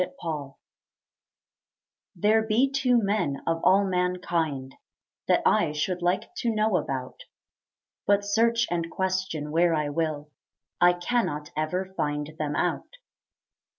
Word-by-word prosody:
Two 180 Hz, -, +1 dB, 0.2 s
Men 150 Hz, -5 st, -4 dB, 1.6 s
There 210 Hz, +5 st, +3 dB
be 225 Hz, +5 st, +2 dB
two 255 Hz, -3 st, +3 dB
men 200 Hz, -9 st, 0 dB
of 165 Hz, 0 st, 0 dB
all 200 Hz, +2 st, +5 dB
mankind 175 Hz, -7 st, -1 dB, 0.5 s
That -, -, +3 dB
I 150 Hz, -, +3 dB
should 175 Hz, +4 st, -2 dB
like 175 Hz, -, 0 dB
to 240 Hz, -, 0 dB
know 215 Hz, -3 st, +2 dB
about; 130 Hz, -5 st, -4 dB, 0.9 s
But 200 Hz, 0 st, +3 dB
search 230 Hz, +3 st, +2 dB
and 170 Hz, -1 st, -1 dB
question 185 Hz, -6 st, -2 dB
where 165 Hz, +1 st, +3 dB
I 150 Hz, -1 st, -1 dB
will, 150 Hz, -1 st, -2 dB, 0.5 s
I 175 Hz, 0 st, +7 dB
cannot 175 Hz, -6 st, -2 dB
ever 180 Hz, +5 st, -2 dB
find 150 Hz, -1 st, -2 dB
them 150 Hz, -1 st, -2 dB
out. -, -, -2 dB
175 Hz, 125 wpm, -26 LUFS, 150-205 Hz, 1.6 s, I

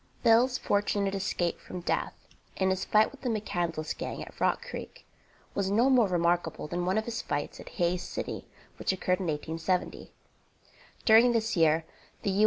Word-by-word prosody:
Bill's 245 Hz, +3 st, +5 dB
fortunate 200 Hz, -1 st, 0 dB
escape 185 Hz, -3 st, -1 dB
from 180 Hz, -, -8 dB
death -, -, -1 dB, 0.4 s
in 190 Hz, 0 st, +1 dB
his 190 Hz, -, -1 dB
fight 215 Hz, 0 st, +4 dB
with 280 Hz, -, -15 dB
the 255 Hz, -, -1 dB
McCandlas 175 Hz, -7 st, -2 dB
gang -, -, -5 dB
at -, -, -13 dB
Rock 480 Hz, -, +1 dB
Creek -, -, -8 dB, 0.5 s
was 195 Hz, -1 st, 0 dB
no 235 Hz, +7 st, +4 dB
more 245 Hz, -5 st, +5 dB
remarkable 175 Hz, -3 st, 0 dB
than 175 Hz, +2 st, -2 dB
one 190 Hz, +3 st, +2 dB
of 220 Hz, -, 0 dB
his 235 Hz, -1 st, -3 dB
fights 145 Hz, 0 st, -3 dB
at -, -, -9 dB
Hays 175 Hz, +1 st, +1 dB
City -, -, -5 dB, 0.3 s
which -, -, +1 dB
occurred 185 Hz, -1 st, 0 dB
in 185 Hz, -, -3 dB
1870. 165 Hz, +4 st, -2 dB, 0.9 s
During 230 Hz, +2 st, +7 dB
this 225 Hz, -1 st, 0 dB
year, 160 Hz, -1 st, +3 dB, 0.4 s
the 200 Hz, -, +1 dB
7th -, -, -2 dB
U. -, -, +2 dB
190 Hz, 180 wpm, -29 LUFS, 175-220 Hz, 0.9 s, During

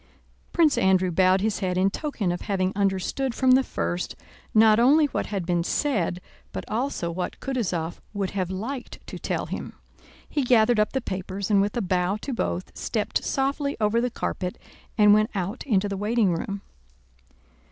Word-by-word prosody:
Prince 325 Hz, -4 st, +3 dB
Andrew 185 Hz, -1 st, +3 dB
bowed 185 Hz, +2 st, +4 dB
his 215 Hz, 0 st, 0 dB
head 185 Hz, -2 st, -1 dB
in 190 Hz, +1 st, +3 dB
token 225 Hz, -, -2 dB
of 175 Hz, -, -3 dB
having 190 Hz, -2 st, -1 dB
understood 200 Hz, +6 st, 0 dB
from 260 Hz, -1 st, +3 dB
the 260 Hz, +1 st, +6 dB
first 85 Hz, -, -3 dB, 0.4 s
not 220 Hz, 0 st, +6 dB
only 290 Hz, +6 st, +6 dB
what 285 Hz, -, -2 dB
had 195 Hz, -4 st, -3 dB
been 175 Hz, -1 st, +1 dB
said 185 Hz, -, 0 dB, 0.3 s
but -, -, -5 dB
also 220 Hz, -7 st, -2 dB
what 180 Hz, +1 st, -4 dB
Kutúzov 180 Hz, -11 st, -2 dB
would 200 Hz, -3 st, -2 dB
have 185 Hz, -3 st, -2 dB
liked 235 Hz, +8 st, -5 dB
to -, -, -8 dB
tell -, -, -2 dB
him. -, -, -6 dB, 0.5 s
He 290 Hz, -, -1 dB
gathered 240 Hz, -2 st, +4 dB
up 210 Hz, -, +1 dB
the 265 Hz, -, 0 dB
papers 190 Hz, 0 st, -4 dB
and 200 Hz, -1 st, +5 dB
with 205 Hz, +3 st, -1 dB
a 235 Hz, -, 0 dB
bow 185 Hz, +2 st, +1 dB
to 275 Hz, -, -4 dB
both, 185 Hz, -5 st, -3 dB
stepped 215 Hz, -3 st, -2 dB
softly 280 Hz, +1 st, -1 dB
over 220 Hz, +2 st, +2 dB
the 250 Hz, -, 0 dB
carpet 180 Hz, -5 st, -3 dB, 0.4 s
and 210 Hz, -1 st, +7 dB
went 215 Hz, +1 st, +3 dB
out 195 Hz, +5 st, -3 dB
into 205 Hz, -5 st, +2 dB
the 200 Hz, -, -3 dB
waiting 210 Hz, -1 st, +2 dB
room. 200 Hz, +4 st, -4 dB
205 Hz, 175 wpm, -25 LUFS, 185-240 Hz, 0.5 s, and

